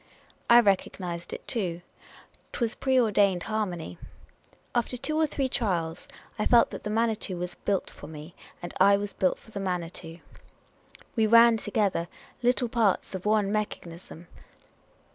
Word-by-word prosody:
I 240 Hz, 0 st, +9 dB
recognised 185 Hz, -4 st, -1 dB
it -, -, -8 dB
too. 175 Hz, -8 st, -2 dB, 0.7 s
'T -, -, -5 dB
was 235 Hz, -2 st, 0 dB
a -, -, -18 dB
pre 265 Hz, -1 st, +2 dB
ordained 200 Hz, -6 st, +3 dB
harmony. 180 Hz, -, -3 dB, 0.7 s
After 245 Hz, +1 st, 0 dB
two 310 Hz, +5 st, -2 dB
or 315 Hz, 0 st, +3 dB
three 275 Hz, -2 st, -1 dB
trials 175 Hz, -9 st, -2 dB, 0.3 s
I 210 Hz, -, +1 dB
felt 235 Hz, -1 st, +5 dB
that -, -, -7 dB
the 210 Hz, -, -3 dB
Manitou 220 Hz, -3 st, 0 dB
was 175 Hz, 0 st, -4 dB
built 200 Hz, -2 st, -2 dB
for 145 Hz, -, -11 dB
me, 155 Hz, +2 st, -10 dB, 0.3 s
and 175 Hz, -, -6 dB
I 200 Hz, +1 st, +6 dB
was 205 Hz, 0 st, -5 dB
built 185 Hz, -, +1 dB
for 220 Hz, -, -19 dB
the 205 Hz, -, -5 dB
Manitou. 175 Hz, -3 st, -4 dB, 1.0 s
We 220 Hz, -2 st, +3 dB
ran 230 Hz, +1 st, +7 dB
together 205 Hz, -5 st, 0 dB, 0.3 s
like 245 Hz, -1 st, +1 dB
parts 220 Hz, -6 st, +1 dB
of 190 Hz, +2 st, -4 dB
one 210 Hz, -2 st, +2 dB
mechanism. 175 Hz, -5 st, -5 dB
205 Hz, 155 wpm, -27 LUFS, 175-230 Hz, 1.0 s, I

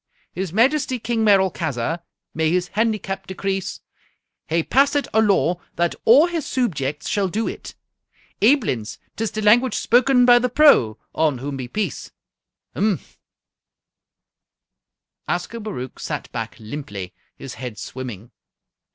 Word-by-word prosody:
"His 185 Hz, -1 st, -4 dB
Majesty 260 Hz, -, +2 dB
King 230 Hz, -1 st, -1 dB
Merolchazzar 175 Hz, -, +1 dB, 0.3 s
may 160 Hz, 0 st, +1 dB
his 180 Hz, +1 st, 0 dB
handicap 205 Hz, -3 st, -2 dB
decrease! 190 Hz, 0 st, -3 dB, 0.7 s
hae 165 Hz, +1 st, +1 dB
passit 280 Hz, -, +2 dB
a 220 Hz, -, +4 dB
law 180 Hz, -4 st, +2 dB
that 170 Hz, 0 st, +1 dB
a' 265 Hz, +8 st, +8 dB
his 340 Hz, -3 st, -3 dB
soobjects 150 Hz, -, -2 dB
shall 200 Hz, -2 st, +1 dB
do 220 Hz, +5 st, -2 dB
it. -, -, -7 dB, 0.7 s
Aiblins, 210 Hz, -, +2 dB, 0.2 s
'tis 225 Hz, -1 st, -2 dB
the 215 Hz, -, -4 dB
language 235 Hz, +3 st, +4 dB
spoken 250 Hz, +1 st, +4 dB
by 245 Hz, 0 st, +7 dB
The 250 Hz, +1 st, 0 dB
Pro, 235 Hz, -, +5 dB, 0.2 s
on 155 Hz, -4 st, +1 dB
whom 140 Hz, +3 st, -5 dB
be 130 Hz, -2 st, -5 dB
peace! 195 Hz, -, -3 dB, 0.7 s
Mphm!" 205 Hz, -2 st, +1 dB, 2.3 s
Ascobaruch 180 Hz, -, -4 dB
sat 150 Hz, -4 st, -5 dB
back 115 Hz, -2 st, -5 dB
limply, 105 Hz, -6 st, -7 dB, 0.2 s
his 135 Hz, -1 st, -8 dB
head 125 Hz, -4 st, -7 dB
swimming. 120 Hz, -1 st, -7 dB
190 Hz, 125 wpm, -22 LUFS, 140-230 Hz, 2.3 s, a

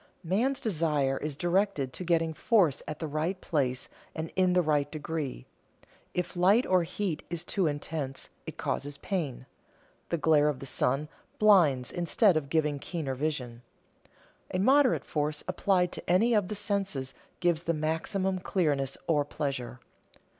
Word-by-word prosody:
Man's 235 Hz, +10 st, +1 dB
desire 150 Hz, -, +1 dB
is 150 Hz, -1 st, -3 dB
directed 175 Hz, -7 st, 0 dB
to -, -, -5 dB
getting 165 Hz, -2 st, +1 dB
force 180 Hz, -, +2 dB
at 155 Hz, -, -4 dB
the 160 Hz, -, -4 dB
right 160 Hz, +5 st, -2 dB
place 130 Hz, -7 st, -1 dB, 0.3 s
and 160 Hz, 0 st, -4 dB
in 185 Hz, -1 st, +3 dB
the 180 Hz, 0 st, +4 dB
right 145 Hz, -2 st, +1 dB
degree. 155 Hz, -, -4 dB, 0.7 s
If 180 Hz, 0 st, -2 dB
light 195 Hz, +8 st, +4 dB
or 185 Hz, -1 st, +3 dB
heat 175 Hz, 0 st, -3 dB
is 170 Hz, -1 st, -3 dB
too 190 Hz, -5 st, 0 dB
intense, 145 Hz, -2 st, -3 dB, 0.2 s
it -, -, -7 dB
causes 145 Hz, 0 st, -3 dB
pain; 155 Hz, -10 st, -3 dB, 0.6 s
the 170 Hz, -, 0 dB
glare 150 Hz, -1 st, +4 dB
of 145 Hz, -, -2 dB
the 135 Hz, -, -8 dB
sun 135 Hz, +2 st, 0 dB, 0.3 s
blinds 170 Hz, -, +4 dB
instead 175 Hz, +3 st, +3 dB
of 145 Hz, -3 st, -1 dB
giving 150 Hz, -2 st, +1 dB
keener 155 Hz, -4 st, -3 dB
vision. 130 Hz, -4 st, -3 dB, 0.9 s
A -, -, -1 dB
moderate 260 Hz, +6 st, +4 dB
force 150 Hz, 0 st, -2 dB
applied 180 Hz, -3 st, +1 dB
to -, -, -7 dB
any 220 Hz, +7 st, +4 dB
of 205 Hz, -4 st, +2 dB
the 210 Hz, -, -4 dB
senses 195 Hz, -10 st, -2 dB, 0.3 s
gives 170 Hz, -3 st, +2 dB
the 170 Hz, -, +1 dB
maximum 185 Hz, +5 st, -1 dB
clearness 145 Hz, -8 st, 0 dB
or 150 Hz, -3 st, +2 dB
pleasure. 140 Hz, -4 st, -4 dB
160 Hz, 155 wpm, -29 LUFS, 145-185 Hz, 0.9 s, the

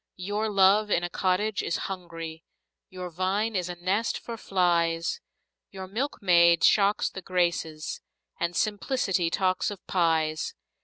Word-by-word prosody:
Your 205 Hz, +4 st, -2 dB
love 200 Hz, +1 st, +4 dB
in 175 Hz, -, +2 dB
a 175 Hz, -, -3 dB
cottage 195 Hz, +3 st, 0 dB
is 170 Hz, -, -1 dB
hungry, 165 Hz, -3 st, -7 dB, 0.5 s
Your 180 Hz, -1 st, -7 dB
vine 195 Hz, +6 st, -1 dB
is 180 Hz, -2 st, -1 dB
a 175 Hz, -, -4 dB
nest 190 Hz, +6 st, -1 dB
for 235 Hz, -, -7 dB
flies 170 Hz, -5 st, 0 dB, 0.5 s
Your 190 Hz, -1 st, -7 dB
milkmaid 180 Hz, -, +3 dB
shocks 205 Hz, 0 st, +4 dB
the 190 Hz, -, -7 dB
Graces, 170 Hz, -4 st, -1 dB, 0.4 s
And 170 Hz, 0 st, -1 dB
simplicity 205 Hz, -4 st, 0 dB
talks 185 Hz, +3 st, 0 dB
of 200 Hz, -3 st, -9 dB
pies! 160 Hz, -3 st, 0 dB
185 Hz, 135 wpm, -27 LUFS, 170-200 Hz, 0.5 s, love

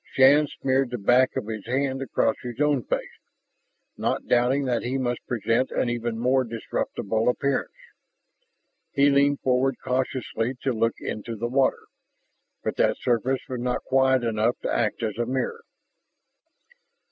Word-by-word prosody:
Shann 145 Hz, +3 st, +6 dB
smeared 135 Hz, -1 st, 0 dB
the 125 Hz, -, -3 dB
back 125 Hz, +5 st, +3 dB
of -, -, -2 dB
his 110 Hz, -2 st, -5 dB
hand 135 Hz, +1 st, -1 dB
across 135 Hz, -, +1 dB
his 120 Hz, 0 st, -7 dB
own 150 Hz, -3 st, +2 dB
face, -, -, -3 dB, 0.8 s
not -, -, -1 dB
doubting 125 Hz, +3 st, +2 dB
that 120 Hz, -2 st, 0 dB
he 130 Hz, +2 st, -2 dB
must 125 Hz, -2 st, -2 dB
present 120 Hz, +2 st, 0 dB
an 120 Hz, -, 0 dB
even 120 Hz, -1 st, -3 dB
more 130 Hz, +3 st, +2 dB
disreputable 115 Hz, -1 st, -2 dB
appearance. 140 Hz, +2 st, -1 dB, 1.2 s
He 140 Hz, +1 st, +4 dB
leaned 140 Hz, 0 st, +3 dB
forward 130 Hz, +1 st, +2 dB
cautiously 125 Hz, -1 st, -1 dB
to 135 Hz, -, +1 dB
look 115 Hz, 0 st, +1 dB
into 115 Hz, +2 st, -5 dB
the 115 Hz, +2 st, -3 dB
water, 130 Hz, +2 st, +1 dB, 0.8 s
but -, -, -3 dB
that -, -, +2 dB
surface 125 Hz, +2 st, 0 dB
was 125 Hz, -1 st, -4 dB
not 125 Hz, 0 st, -1 dB
quiet 130 Hz, -1 st, +3 dB
enough 115 Hz, +1 st, +1 dB
to -, -, -1 dB
act 110 Hz, 0 st, 0 dB
as 110 Hz, 0 st, -3 dB
a 120 Hz, -, 0 dB
mirror. 135 Hz, -, -2 dB
125 Hz, 150 wpm, -25 LUFS, 115-135 Hz, 1.2 s, Shann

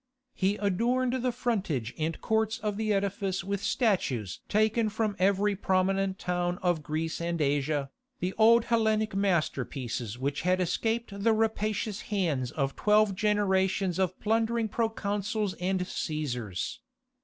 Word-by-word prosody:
He 195 Hz, +1 st, +1 dB
adorned 240 Hz, +6 st, +1 dB
the 250 Hz, 0 st, +1 dB
frontage 190 Hz, -, -2 dB
and 160 Hz, +1 st, -2 dB
courts 220 Hz, 0 st, +1 dB
of 210 Hz, -3 st, -2 dB
the 215 Hz, 0 st, -1 dB
edifice 195 Hz, -2 st, -1 dB
with 200 Hz, +1 st, -2 dB
statues 155 Hz, -, 0 dB
taken 215 Hz, +1 st, +2 dB
from 210 Hz, -1 st, -1 dB
every 200 Hz, +2 st, +2 dB
prominent 190 Hz, 0 st, +1 dB
town 180 Hz, -1 st, -1 dB
of 175 Hz, -3 st, +2 dB
Greece 160 Hz, +2 st, -3 dB
and 170 Hz, 0 st, -2 dB
Asia, 145 Hz, -1 st, 0 dB, 0.3 s
the 185 Hz, +1 st, -2 dB
old 230 Hz, +1 st, +6 dB
Hellenic 220 Hz, -2 st, +1 dB
masterpieces 135 Hz, -, -1 dB
which 140 Hz, +2 st, -2 dB
had 185 Hz, +2 st, +2 dB
escaped 225 Hz, +5 st, -1 dB
the 225 Hz, 0 st, +4 dB
rapacious 215 Hz, -1 st, -1 dB
hands 160 Hz, -, -1 dB
of 135 Hz, -1 st, -2 dB
twelve 210 Hz, -1 st, +3 dB
generations 190 Hz, -2 st, +1 dB
of 185 Hz, -1 st, 0 dB
plundering 225 Hz, +1 st, +1 dB
proconsuls 210 Hz, -2 st, -1 dB
and 185 Hz, +1 st, 0 dB
Cæsars. 130 Hz, -, -3 dB
195 Hz, 130 wpm, -29 LUFS, 170-215 Hz, 0.3 s, old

